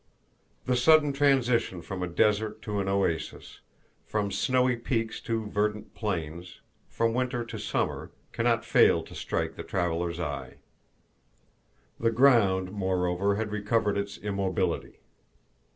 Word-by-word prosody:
The 125 Hz, -, +1 dB
sudden 150 Hz, +3 st, +5 dB
transition 125 Hz, -, +2 dB
from 95 Hz, -1 st, -6 dB
a 90 Hz, -, -1 dB
desert 105 Hz, +4 st, +1 dB
to 105 Hz, -1 st, -2 dB
an 95 Hz, -, -2 dB
oasis, 95 Hz, -5 st, -2 dB, 0.5 s
from 105 Hz, -2 st, -1 dB
snowy 125 Hz, +5 st, +2 dB
peaks 115 Hz, -1 st, -2 dB
to 115 Hz, -2 st, -2 dB
verdant 105 Hz, +1 st, -2 dB
plains, 85 Hz, -4 st, -4 dB, 0.3 s
from 115 Hz, 0 st, 0 dB
Winter 125 Hz, -1 st, -1 dB
to -, -, -7 dB
Summer, -, -, -2 dB, 0.2 s
can -, -, -2 dB
not -, -, +2 dB
fail -, -, +4 dB
to -, -, -13 dB
strike -, -, -2 dB
the -, -, -5 dB
traveler's 85 Hz, -1 st, -2 dB
eye. 75 Hz, -5 st, -4 dB, 1.4 s
The 115 Hz, -, +2 dB
ground, 110 Hz, -7 st, +4 dB
moreover, 95 Hz, 0 st, 0 dB
had 105 Hz, 0 st, -3 dB
recovered 105 Hz, 0 st, 0 dB
its 100 Hz, 0 st, -3 dB
immobility. 100 Hz, -3 st, -2 dB
105 Hz, 130 wpm, -28 LUFS, 95-115 Hz, 1.4 s, sudden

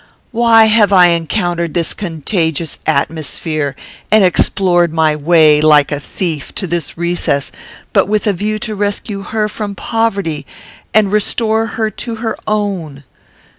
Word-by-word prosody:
Why 230 Hz, -2 st, +5 dB
have 215 Hz, -2 st, +3 dB
I 180 Hz, -2 st, +6 dB
encountered 170 Hz, 0 st, -1 dB
this 170 Hz, -2 st, 0 dB
contagious 165 Hz, -3 st, -2 dB
atmosphere, 155 Hz, -1 st, -2 dB, 0.3 s
and 215 Hz, -1 st, +5 dB
explored 175 Hz, -1 st, +2 dB
my 160 Hz, -1 st, +2 dB
way, 155 Hz, -1 st, +4 dB
like 150 Hz, -2 st, +4 dB
a 145 Hz, -, -2 dB
thief, 155 Hz, -1 st, -4 dB
to 195 Hz, -, -3 dB
this 170 Hz, -2 st, -4 dB
recess, 170 Hz, -5 st, -1 dB, 0.4 s
but -, -, +3 dB
with 210 Hz, +1 st, 0 dB
a 205 Hz, -, +2 dB
view 210 Hz, +4 st, -2 dB
to 220 Hz, -, -4 dB
rescue 205 Hz, 0 st, -3 dB
her 215 Hz, +1 st, -2 dB
from 210 Hz, -1 st, -6 dB
poverty 195 Hz, -11 st, -2 dB, 0.4 s
and 215 Hz, -2 st, +3 dB
restore 220 Hz, +1 st, 0 dB
to 230 Hz, +1 st, -6 dB
her 220 Hz, -, -11 dB
her -, -, -5 dB
own? 190 Hz, -9 st, -3 dB
180 Hz, 140 wpm, -15 LUFS, 160-215 Hz, 0.4 s, I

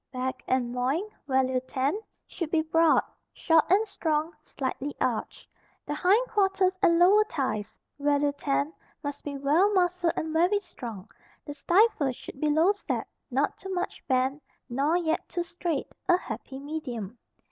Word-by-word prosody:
Back 260 Hz, 0 st, -3 dB
and 245 Hz, -2 st, 0 dB
loin 260 Hz, +8 st, 0 dB, 0.2 s
(value 260 Hz, -1 st, +2 dB
10) 265 Hz, +7 st, -1 dB, 0.3 s
should 335 Hz, -4 st, -5 dB
be 315 Hz, -1 st, +2 dB
broad, 325 Hz, 0 st, +4 dB, 0.3 s
short 325 Hz, -2 st, +3 dB
and 415 Hz, +4 st, +4 dB
strong, 315 Hz, -3 st, -1 dB
slightly 280 Hz, -1 st, -4 dB
arched. -, -, -2 dB, 0.4 s
The 295 Hz, -, -3 dB
hindquarters 385 Hz, 0 st, +2 dB
and 335 Hz, -4 st, +5 dB
lower 390 Hz, +5 st, +6 dB
thighs 260 Hz, -, -3 dB, 0.2 s
(value 285 Hz, 0 st, +2 dB
10) 285 Hz, +1 st, -1 dB, 0.3 s
must 285 Hz, 0 st, -5 dB
be 285 Hz, -1 st, -4 dB
well 305 Hz, +9 st, +3 dB
muscled 355 Hz, -2 st, +2 dB
and 315 Hz, 0 st, -3 dB
very 355 Hz, +5 st, +3 dB
strong. 235 Hz, -, -9 dB, 0.4 s
The 290 Hz, -, -6 dB
stifle 345 Hz, -, +3 dB
should 265 Hz, -, -11 dB
be 305 Hz, -, +2 dB
low 320 Hz, +6 st, +4 dB
set, 410 Hz, -, -3 dB, 0.2 s
not -, -, 0 dB
too 385 Hz, -, -7 dB
much 355 Hz, -, -3 dB
bent, 265 Hz, +1 st, +1 dB, 0.3 s
nor 280 Hz, +7 st, +1 dB
yet 330 Hz, -2 st, -1 dB
too 350 Hz, -, -2 dB
straight, 345 Hz, -2 st, -3 dB, 0.2 s
a 355 Hz, -, +6 dB
happy 270 Hz, -6 st, -7 dB
medium. 250 Hz, -7 st, -5 dB
305 Hz, 150 wpm, -27 LUFS, 270-355 Hz, 0.4 s, lower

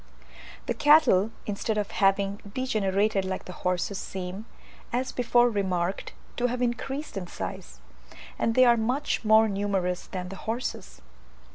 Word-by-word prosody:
The -, -, -1 dB
cattle, 290 Hz, -10 st, +5 dB, 0.2 s
instead 215 Hz, +1 st, -2 dB
of 205 Hz, 0 st, -2 dB
having 195 Hz, 0 st, +2 dB
degenerated 205 Hz, -4 st, 0 dB
like 190 Hz, 0 st, -4 dB
the 180 Hz, -, -8 dB
horses 180 Hz, +2 st, -2 dB
seem, 190 Hz, +3 st, -6 dB, 0.4 s
as 255 Hz, +2 st, -1 dB
before 240 Hz, 0 st, +3 dB
remarked, 190 Hz, -4 st, -1 dB, 0.2 s
to 245 Hz, -, +2 dB
have 250 Hz, 0 st, -3 dB
increased 265 Hz, +2 st, -3 dB
in 180 Hz, -2 st, -4 dB
size; 65 Hz, -, -7 dB, 0.6 s
and 230 Hz, -, +1 dB
they 255 Hz, -, +7 dB
are 240 Hz, -1 st, +5 dB
much 245 Hz, +6 st, -1 dB
more 220 Hz, 0 st, +6 dB
numerous 195 Hz, -3 st, -1 dB
than 180 Hz, -1 st, -5 dB
the 195 Hz, -, -8 dB
horses. 225 Hz, -, -5 dB
210 Hz, 140 wpm, -27 LUFS, 190-240 Hz, 0.6 s, they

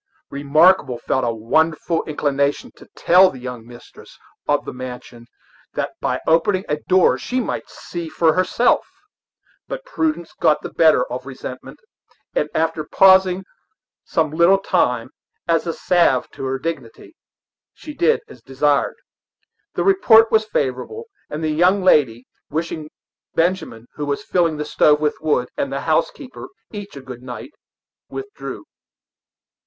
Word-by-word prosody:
Remarkable 145 Hz, -1 st, +3 dB
felt 130 Hz, +2 st, -1 dB
a 120 Hz, -, +1 dB
wonderful 160 Hz, +9 st, 0 dB
inclination 145 Hz, -2 st, -1 dB
to -, -, -16 dB
tell 185 Hz, +2 st, +5 dB
the 135 Hz, -, -10 dB
young 125 Hz, -2 st, -7 dB
mistress 120 Hz, 0 st, -15 dB, 0.3 s
of -, -, +1 dB
the -, -, -6 dB
mansion 125 Hz, -2 st, -9 dB, 0.5 s
that -, -, -2 dB
by -, -, -1 dB
opening 185 Hz, +4 st, +2 dB
a 150 Hz, -, -1 dB
door 185 Hz, -1 st, +4 dB
she 255 Hz, -, -2 dB
might 250 Hz, -, -4 dB
see 170 Hz, -2 st, -7 dB
for 160 Hz, 0 st, +2 dB
herself; 185 Hz, +7 st, +2 dB, 0.8 s
but -, -, -6 dB
prudence 315 Hz, -, -2 dB
got 150 Hz, -, +2 dB
the -, -, -6 dB
better 155 Hz, -6 st, +4 dB
of 125 Hz, +2 st, -5 dB
resentment, 130 Hz, -1 st, -9 dB, 0.6 s
and -, -, 0 dB
after 160 Hz, -1 st, 0 dB
pausing 190 Hz, +2 st, +4 dB, 0.6 s
some 160 Hz, -2 st, 0 dB
little 170 Hz, +5 st, +4 dB
time, 125 Hz, -11 st, 0 dB, 0.4 s
as 165 Hz, 0 st, +1 dB
a 165 Hz, -, -1 dB
salve 170 Hz, -9 st, +2 dB
to 135 Hz, -, -7 dB
her 135 Hz, 0 st, -1 dB
dignity, 140 Hz, -, -7 dB, 0.6 s
she 300 Hz, -, -10 dB
did 170 Hz, -, +2 dB
as 125 Hz, -, -15 dB
desired. 140 Hz, +3 st, 0 dB, 0.8 s
The -, -, 0 dB
report 230 Hz, -, +5 dB
was 220 Hz, 0 st, +3 dB
favorable, 145 Hz, -, -3 dB, 0.3 s
and 155 Hz, +2 st, -5 dB
the 155 Hz, -, 0 dB
young 180 Hz, +5 st, +3 dB
lady, 130 Hz, -9 st, +3 dB, 0.2 s
wishing 155 Hz, 0 st, -4 dB, 0.5 s
Benjamin, 165 Hz, -10 st, -1 dB
who 145 Hz, -1 st, -5 dB
was 140 Hz, 0 st, -2 dB
filling 170 Hz, -4 st, +1 dB
the 150 Hz, -, -3 dB
stove 150 Hz, 0 st, +3 dB
with 150 Hz, 0 st, -1 dB
wood, 145 Hz, -5 st, 0 dB
and 140 Hz, -, -2 dB
the 140 Hz, 0 st, -3 dB
housekeeper, 250 Hz, -, -2 dB, 0.2 s
each 205 Hz, -5 st, -8 dB
a 140 Hz, -, -8 dB
good 130 Hz, -2 st, -10 dB
night, 125 Hz, -, -8 dB, 0.6 s
withdrew. 410 Hz, +1 st, -7 dB
155 Hz, 145 wpm, -20 LUFS, 135-185 Hz, 0.8 s, tell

